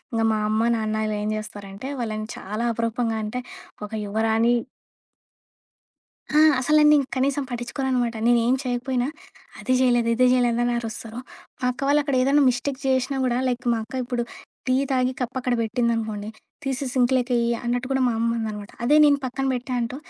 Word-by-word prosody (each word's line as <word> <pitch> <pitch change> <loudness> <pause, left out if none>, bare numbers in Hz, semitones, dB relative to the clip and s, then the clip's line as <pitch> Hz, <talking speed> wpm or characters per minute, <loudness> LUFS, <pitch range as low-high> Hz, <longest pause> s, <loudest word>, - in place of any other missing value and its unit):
ఇంగ 225 -1 0
మా 215 - 0
అమ్మ 215 +1 +1
నాన్నలేం 215 -1 -1
జేస్తారంటే 205 +1 -7
వాళ్ళని 215 -3 -3
చాలా 210 +4 -4
అపరూపంగా 230 0 -1
అంటే, 215 +4 -3 0.4
ఒక 210 - -7 0.2
యువరాణి 225 +3 +2 1.8
ఆ! 300 - +3 0.2
అసల 305 +4 +2
నన్నిం 300 -1 +6 0.2
కనీసం 275 +2 +1
పటించుకోననమాట. 245 0 -1
నేనుం 240 +1 +4
చేయకపోయినా 250 0 -1 0.5
"అది 255 - -1
జేయలేదు, 240 -2 +3
ఇది 255 +2 +4
జేయలేదు" 240 -2 +2
అని 240 - +1
అరుస్తరు. 225 0 -6 0.4
మా - - -4
అక్క 250 +2 -7
వాళ్ళక్కడ 285 -1 +2
ఏదైనా 280 +3 +4
మిస్టేక్ 260 +2 -3
జేసినా 265 +1 +1
గూడా 245 -1 +1
లైక్ 250 0 -2
మా 230 - 0
అక్క 225 - -14
ఇప్పుడు 245 -1 -2 0.4
టీ 255 - +2 0.2
తాగి 255 -1 +2
కప్పక్కడ 250 0 -1
బెట్టిందనుకోండి. 225 -2 -1 0.4
తీసి 270 0 -2
సింక్‌లోకేయ్యి 250 -2 +2 0.2
అన్నట్టు 245 +1 -1
కూడా 265 -1 +1
మా - - +1
అమ్మ 230 +1 +1
అనదనమాట. 210 -2 -5
అదే 290 +5 +4
నేను 285 -1 +5
పక్కన 260 +1 -2
బెట్టా 250 +1 -4
అంటూ, 240 +2 -3
245 Hz, 150 wpm, -24 LUFS, 225-260 Hz, 1.8 s, నన్నిం